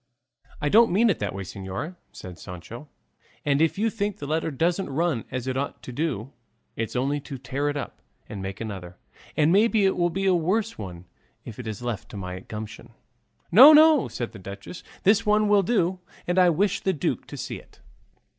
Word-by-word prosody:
"I 150 - -1
don't 225 +8 +6
mean 220 +5 +4
it - - -3
that 100 -2 -3
way, 100 - -4
señora," 95 - -6 0.2
said 90 -1 -10
Sancho; 115 - -9 0.6
"and 145 0 +2
if 160 +3 +2
you 220 +2 +1
think 205 -2 -2
the 145 - -7
letter 160 +2 -1
doesn't 170 +6 0
run 150 -3 0
as 130 -1 -4
it 130 -1 -2
ought 140 +2 -4
to - - -7
do, 135 -3 -3 0.4
it's 115 +2 -4
only 140 +4 0
to 140 -1 -8
tear 135 +3 -2
it 145 - -2
up 145 - -6 0.3
and 100 -2 -7
make 95 0 -6
another; 95 -5 -7 0.4
and 155 +1 +4
maybe 210 +1 +4
it 190 - +2
will 175 -1 +2
be 195 +3 -2
a 190 - +4
worse 195 +7 0
one 90 -4 -8 0.4
if 115 - -9
it 120 - -6
is 110 +1 -5
left 120 -4 -4
to 105 - -8
my 90 -1 -5
gumption." 110 +3 -9 0.6
"No, 260 - +10
no," 310 -3 +6
said 120 - -5
the 105 - -11
duchess, 100 - -9 0.2
"this 205 +3 +4
one 210 0 +3
will 205 -1 +5
do, 185 -3 +1 0.3
and 175 +1 +1
I 180 -1 +6
wish 190 +5 +1
the 190 - 0
duke 150 - -2
to - - -8
see - - -5
it." - - -21
145 Hz, 205 wpm, -25 LUFS, -, 0.6 s, No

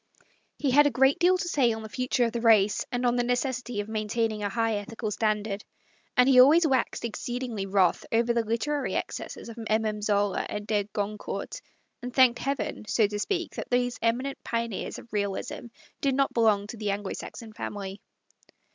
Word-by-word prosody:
He 280 - 0
had 290 +3 +6
a - - +3
great 265 +2 +3
deal 365 +1 +4
to 355 - -3
say 270 -8 +3
on 220 0 -4
the - - -6
future 250 +1 0
of 230 - -1
the 235 0 -3
race, 215 -3 +4
and 245 0 -1
of 240 0 +3
the 245 - +2
necessity 245 -2 -1
of 205 - -8
maintaining 220 0 -1
a 205 - -1
high 225 0 0
ethical 215 +1 -5
standard, 210 -1 -1 0.5
and 250 +1 +6
he 260 -2 +6
always 315 +6 +6
waxed 260 -4 0
exceedingly 235 -2 -4
wrath 190 -2 +2
over 235 +1 +2
the 235 -1 +1
literary 235 +7 -1
excesses - - -5
of 230 0 -9
MM. 220 -1 -1
Zola 205 -1 +1
and 210 0 -4
de 210 -1 0
Gron 210 0 -3
court, - - -5 0.4
and 250 0 -5
thanked 250 -1 +5
Heaven, 275 -5 -3
so 215 +1 +3
to 205 0 -3
speak, 350 - -2
that - - -6
those 245 0 0
eminent 250 +4 -1
pioneers 230 -3 -3
of 230 - -13
Realism 200 +4 -3 0.4
did 275 -2 +1
not 275 0 +1
belong 215 -3 +3
to 220 +3 -8
the 210 -1 -2
Anglo 200 0 -2
Saxon 225 -3 -8
family. 200 -2 -6
230 Hz, 190 wpm, -27 LUFS, 210-250 Hz, 0.5 s, had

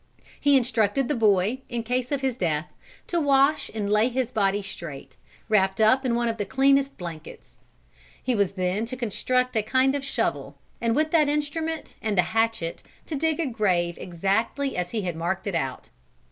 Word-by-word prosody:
"He 285 -1 +5
instructed 240 0 +1
the 295 - +1
boy, 215 +2 +2
in 240 -1 -3
case 250 +2 -2
of 280 -2 0
his 265 -3 0
death, 165 -6 -2 0.3
to 340 -1 -1
wash 280 +1 +3
and 210 -2 -3
lay 210 +3 +3
his 255 -1 -2
body 205 -3 +1
straight, 170 -8 -8 0.3
wrapped 195 -3 +2
up 220 +5 +4
in 245 -3 +1
one 235 0 +1
of 225 -1 -1
the 205 - -1
cleanest 275 +2 +3
blankets. 165 -3 -9 0.7
He 255 - +1
was 200 -4 +1
then 185 +3 -1
to 255 +2 -6
construct 250 +2 0
a 220 - +3
kind 260 +5 +2
of 285 -1 -2
shovel, 280 - -2 0.2
and 230 0 +1
with 310 +1 +1
that 305 -3 +4
instrument 310 +2 -3
and 215 -3 -1
the 180 - +5
hatchet 225 -6 0 0.2
to 315 - -4
dig 320 +2 0
a 330 - +1
grave 185 -8 0
exactly 200 +10 -1
as 180 -1 -2
he 215 -1 -3
had 175 -3 -3
marked 175 +3 -2
it 200 - -2
out. 135 -6 -3
230 Hz, 190 wpm, -25 LUFS, 195-270 Hz, 0.7 s, He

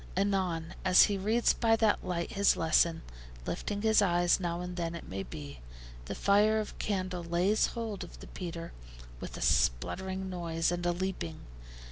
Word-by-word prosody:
Anon, 185 -4 0
as 185 -1 +7
he 205 - +2
reads 220 +5 +2
by 225 -1 +3
that 220 -2 +2
light 170 -1 -3
his 200 0 +3
lesson, 165 0 +2 0.4
lifting 205 - -3
his 220 -1 +5
eyes 175 -2 +3
now 175 -2 -2
and 180 0 -5
then 170 -1 -3
it 170 - -9
may 95 +1 -4
be, 145 +5 -8 0.5
the - - -5
fire 210 +2 +3
of 215 - -5
candle 185 -3 -2
lays 175 +5 +2
hold 220 -4 -4
of - - -12
the - - -10
petre 170 -2 -7 0.5
with - - -7
a - - -8
spluttering 75 - 0
noise 170 -2 -1
and 175 0 -2
a - - +3
leaping. 175 - -4
180 Hz, 170 wpm, -31 LUFS, 170-200 Hz, 0.5 s, as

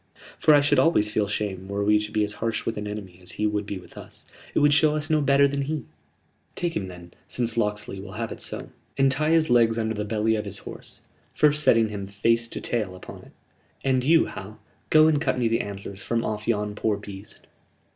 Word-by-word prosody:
For 155 -1 +6
I 145 - +5
should 145 0 +3
always 105 -11 +3
feel 105 -1 +1
shame 100 -2 -3
were 100 +1 -2
we 105 0 +4
to 105 0 -5
be 105 -1 +1
as 105 0 -1
harsh 115 -1 -1
with 115 - -2
an 105 0 -4
enemy 100 -4 -7
as 90 - -8
he 105 - -2
would 105 -1 -1
be 100 - -4
with 90 - -12
us. - - -11 0.3
It - - 0
would 145 0 +5
show 155 0 +4
us 155 +1 -2
no 155 -1 +3
better 140 0 +4
then 140 0 -2
he." 145 -1 -3 0.7
"Take 175 -1 -2
him 95 -2 -2
then, 90 -1 -11
since 120 -2 -2
Locksley 105 -3 -1
will 95 0 -9
have 115 +1 -4
it - - -8
so, - - -6 0.3
and 135 0 +4
tie 150 +4 +1
his 160 -4 +3
legs 115 -2 +4
under 110 -1 -1
the 105 -1 -3
belly 110 +1 0
of 105 -1 -3
his 100 -1 -5
horse - - -10 0.3
first 150 0 +4
setting 115 -6 +4
him 100 -2 -5
face 115 +4 +1
to - - -6
tail 105 -6 -1
upon 90 - -10
it," - - -14 0.6
said 135 - 0
Will. - - +4
"And 130 -1 +1
you, 160 +4 +5
Hal, 100 +3 -9 0.3
go 155 0 +6
and 155 -2 +3
cut 130 -4 0
me 120 -2 +1
the 115 0 +1
antlers 100 -1 -8
from 115 0 -1
off 105 0 -4
yon 105 -2 0
poor 105 0 0
beast." 100 0 -11
110 Hz, 240 wpm, -25 LUFS, 105-135 Hz, 0.7 s, For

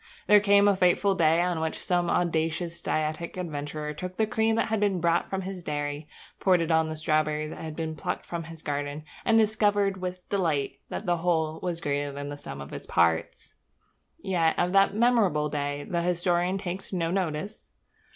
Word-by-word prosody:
There 210 0 +7
came 200 0 +5
a 200 - +4
fateful 185 +2 +3
day 165 -2 +3
on 175 -2 0
which 160 0 -2
some 175 -1 0
audacious 170 0 0
dietetic 155 +3 -2
adventurer 150 -3 -4
took 185 +4 -7
the 220 - +3
cream 220 +1 +1
that 225 - 0
had 220 -1 +1
been 200 -3 +1
brought 170 0 +2
from 190 0 -2
his 190 -1 -6
dairy, 145 -1 -3 0.3
poured 185 -2 +4
it 165 0 -1
on 160 0 +3
the 155 - -4
strawberries 155 0 0
that - - -8
had 160 -1 -6
been 160 -1 -3
plucked - - -4
from 170 -1 -5
his 165 -1 -10
garden, 145 +1 -3 0.2
and 225 - +4
discovered 205 -2 +2
with 180 0 -5
delight 165 -8 0
that 215 - -5
the 175 -1 +1
whole 160 -2 0
was 175 -2 -2
greater 145 -2 -1
than 145 +1 -6
the 145 - -5
sum 70 - -8
of 70 - -9
all - - -6
its - - -11
parts. 85 -1 +1 0.6
Yet 175 -5 +1
of 175 +1 +1
that 195 0 +4
memorable 210 -11 +3
day 145 0 -2
the 170 -1 -1
historian 175 +1 +1
takes 190 0 -5
no 170 -3 -1
notice. 185 +2 -3
170 Hz, 195 wpm, -27 LUFS, 155-190 Hz, 0.6 s, There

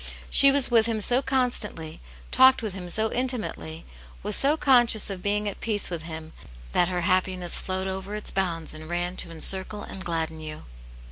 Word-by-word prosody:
She 275 0 +8
was 275 -3 +4
with 225 -1 +4
him 225 -2 -2
so 245 +5 +2
constantly, 245 - -2 0.3
talked 260 -2 +4
with 215 -4 -4
Him 180 -2 -7
so 220 +4 +1
intimately, 235 -10 -4 0.4
was 210 +1 -2
so 290 +3 +2
conscious 240 -8 +3
of 190 -2 -7
being 210 +1 -2
at 205 - -6
peace 210 -4 0
with 170 -2 -4
Him 160 0 -9 0.4
that 175 - +2
her 180 -1 -3
happiness 185 -1 0
flowed 190 0 -4
over 190 +2 -6
its 210 - -2
bounds 170 -4 -2
and 155 +1 -11
ran 175 +1 -3
to - - -1
encircle 190 +5 +2
and 190 - -8
gladden 160 -2 -4
you. 155 -1 -9
190 Hz, 185 wpm, -24 LUFS, 170-225 Hz, 0.4 s, She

